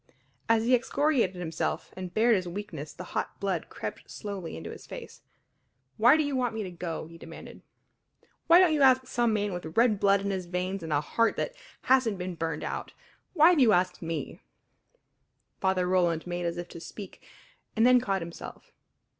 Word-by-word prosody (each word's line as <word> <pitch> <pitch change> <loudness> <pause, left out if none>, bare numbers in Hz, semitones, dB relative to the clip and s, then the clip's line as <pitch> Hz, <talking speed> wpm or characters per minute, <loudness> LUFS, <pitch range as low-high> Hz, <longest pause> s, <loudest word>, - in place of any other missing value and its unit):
As 225 0 +3
he 250 - +3
excoriated 255 -4 +2
himself 175 -2 -3
and 185 -1 -6
bared 230 +3 +4
his 185 -2 -2
weakness 170 -5 -6
the - - -9
hot - - -3
blood - - -2
crept - - -7
slowly 195 - -6
into 80 +1 -7
his - - -11
face. - - -9 0.8
"Why 245 +7 +6
do 310 - +2
you 285 -2 -2
want 245 -3 0
me 220 - -2
to 185 - -6
go?" 170 -2 -5
he 165 +1 -13
demanded. - - -11 0.9
"Why 335 +1 +8
don't 360 -3 +5
you 300 - +1
ask 260 -1 +5
some 240 -2 +1
man 205 -2 0
with 170 -1 -7
red 225 -3 +4
blood 200 0 +4
in 200 0 -2
his 185 -2 -3
veins 180 +2 -2
and 160 -1 -6
a 145 -1 +2
heart 230 +9 +1
that - - -2 0.3
hasn't 255 -6 +3
been 180 0 -4
burned 160 -2 -3
out? - - -5 0.4
Why 325 0 +7
have 345 - +3
you 235 -5 +6
asked 180 0 +1
me?" 165 -1 -4 1.2
Father 190 -1 +1
Roland 175 -3 +1
made 175 0 -3
as 170 0 -3
if 175 0 -5
to - - -9
speak, 195 +4 -10 0.5
and 225 +1 +4
then 250 0 +6
caught 195 -6 -1
himself. 170 0 -10
195 Hz, 190 wpm, -28 LUFS, 175-240 Hz, 1.2 s, Why